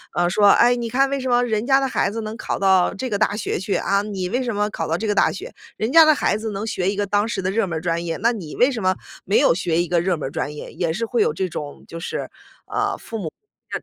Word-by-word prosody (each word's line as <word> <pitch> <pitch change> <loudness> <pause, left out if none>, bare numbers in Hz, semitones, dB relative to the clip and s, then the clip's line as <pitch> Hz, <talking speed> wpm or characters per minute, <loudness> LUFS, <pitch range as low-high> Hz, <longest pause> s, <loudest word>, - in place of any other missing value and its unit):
呃， 175 0 +2
说： 205 +3 +4
“哎， 245 +1 +5
你 235 -1 -3
看 270 +3 +2
为 275 - -1
什 260 -1 -3
么 245 0 +4
人 220 -2 -1
家 270 +1 +4
的 270 - 0
孩 200 - 0
子 225 - -4
能 215 +1 -5
考 - - -3
到 190 -2 +3
这 250 +6 -4
个 205 - 0
大 210 0 +1
学 - - -2
去， 195 +2 -2
啊， 200 0 +1
你 200 -3 -4
为 250 +8 -1
什 240 -2 -2
么 210 0 0
考 165 -5 -4
到 165 +2 -1
这 220 - -3
个 205 - +1
大 - - +4
学？ 440 +7 -8 0.2
人 220 - -1
家 330 - +9
的 310 0 +6
孩 285 - +1
子 220 0 -4
能 205 +2 -4
学 190 -3 0
一 205 - -5
个 205 - 0
当 205 +1 +2
时 225 -3 -3
的 185 - -1
热 225 +1 +1
门 170 -4 -3
儿 - - -5
专 170 0 -1
业， 165 -1 -2
那 230 +5 +2
你 175 -9 -7
为 250 - +5
什 235 -7 -4
么 185 0 +2 0.3
没 195 - +2
有 - - +5
学 170 -2 0
一 175 - -2
个 170 0 +2
热 175 0 0
门 150 - -4
儿 - - -7
专 145 - -3
业？” 150 - -8
也 170 -3 -1
是 220 +8 -2
会 230 -1 0
有 150 - +2
这 185 +4 -2
种 150 -3 -7
就 165 - -8
是， - - -4
呃， - - -3
父 - - -24 1.2
母 - - -30
205 Hz, 325 characters per minute, -22 LUFS, 175-230 Hz, 1.2 s, 家